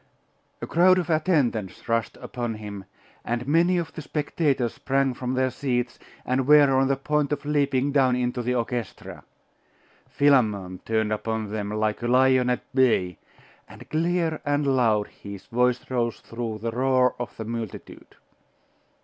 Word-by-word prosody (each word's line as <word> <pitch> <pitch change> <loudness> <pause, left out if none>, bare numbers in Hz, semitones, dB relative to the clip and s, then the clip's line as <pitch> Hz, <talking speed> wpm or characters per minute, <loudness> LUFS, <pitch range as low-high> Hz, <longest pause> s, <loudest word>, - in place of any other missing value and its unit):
A - - 0
crowd 185 +2 +4
of 175 -2 -1
attendants 145 - 0
rushed 115 -1 -1
upon 120 -3 -4
him, 100 -2 -8 0.4
and 120 +1 -3
many 170 +4 +3
of 170 -2 -3
the 160 - -7
spectators 145 -4 -1
sprang 135 -1 0
from 125 +1 -3
their 130 0 +1
seats, 125 -2 -2 0.3
and 130 +1 0
were 145 -2 +7
on 135 0 +3
the 135 - +2
point 150 +1 -1
of 150 - -3
leaping 140 -2 +1
down 130 -3 +3
into 125 0 -1
the 125 +1 -1
orchestra. 120 -2 -4 0.9
Philammon 105 -10 +2
turned 110 -1 0
upon 110 -1 -3
them 105 -1 -3
like 110 +1 -1
a 120 - -2
lion 130 0 +4
at 125 - 0
bay; 115 - +2 0.5
and - - -13
clear 165 0 0
and 145 0 0
loud 110 -5 +2
his 100 -2 -11
voice 125 +1 +1
rose 120 -2 0
through 115 -2 -5
the 115 +2 -3
roar 130 +1 +2
of 120 0 -6
the 110 - -5
multitude. 115 -2 -7
125 Hz, 155 wpm, -25 LUFS, 115-140 Hz, 0.9 s, were